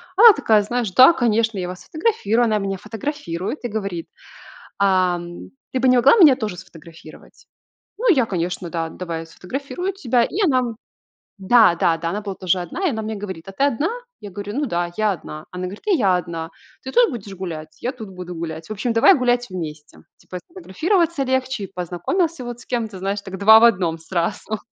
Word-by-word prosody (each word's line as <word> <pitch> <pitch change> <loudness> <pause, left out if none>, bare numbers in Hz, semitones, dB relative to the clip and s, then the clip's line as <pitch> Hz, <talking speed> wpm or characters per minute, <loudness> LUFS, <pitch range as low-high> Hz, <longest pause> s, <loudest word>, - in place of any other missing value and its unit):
Она 455 +3 +10
такая: 220 - +3
"Знаешь, 230 0 -2
да, 255 - +8
конечно, 230 -7 +1
я 180 -1 -3
вас 180 0 -8
сфотографирую". 275 - 0
Она 215 -2 +1
меня 195 -1 -3
фотографирует 225 - -5
и - - +1
говорит: 195 -6 -4 0.7
"Ам, 180 -3 0 0.2
ты 260 - -1
бы 260 - +2
не 255 - +5
могла 245 - +6
меня 305 -9 +8
тоже 215 -7 -4
сфотографировать?" 165 -3 -14 0.5
Ну, 485 -1 +2
я, 260 -6 +2
конечно: 180 -1 -3
"Да, 165 -1 -3
давай 165 -1 -5
я - - -9
сфотографирую 275 - -5
тебя". 250 -9 +1
И - - -4
она, 260 -5 +3
м 235 -3 -3 0.6
Да-да-да. 175 -6 +3
Она 210 +3 -3
была 200 -2 -5
тоже 185 -1 0
одна. 325 - -3
И 345 - +2
она 220 -3 -3
мне 220 0 -4
говорит: 190 -4 -7
"А - - -7
ты 270 - 0
одна?" 285 - +1 0.3
Я 205 - -9
говорю: 205 +2 -6
"Ну 290 +1 -1
да, 175 -4 -2
я 215 -1 +2
одна". 155 -3 -8
Она 180 0 -6
говорит: 190 +3 -7
"И 405 - +4
я 195 - +3
одна. 165 -2 -5 0.3
Ты 265 - -6
тут 485 -5 +4
будешь 205 -6 -7
гулять?" 160 -4 -7
"Я 250 - -1
тут 220 -6 -10
буду 180 -1 -8
гулять". 160 0 -6
В - - -4
общем, 220 +3 -2
давай 230 +12 +6
гулять 245 -1 +1
вместе. 155 -5 -7 0.2
Типа 180 - -8
сфотографироваться 340 - 0
легче 260 -4 -1
и 195 - -10
познакомился 245 - -2
вот 240 0 -7
с - - -14
кем-то, 225 -5 -3
знаешь, 200 +2 -2
так 190 -1 -8
два 220 +3 +8
в - - +6
одном 180 -8 +3
сразу. 190 +5 -3
205 Hz, 200 wpm, -21 LUFS, 180-250 Hz, 0.7 s, Она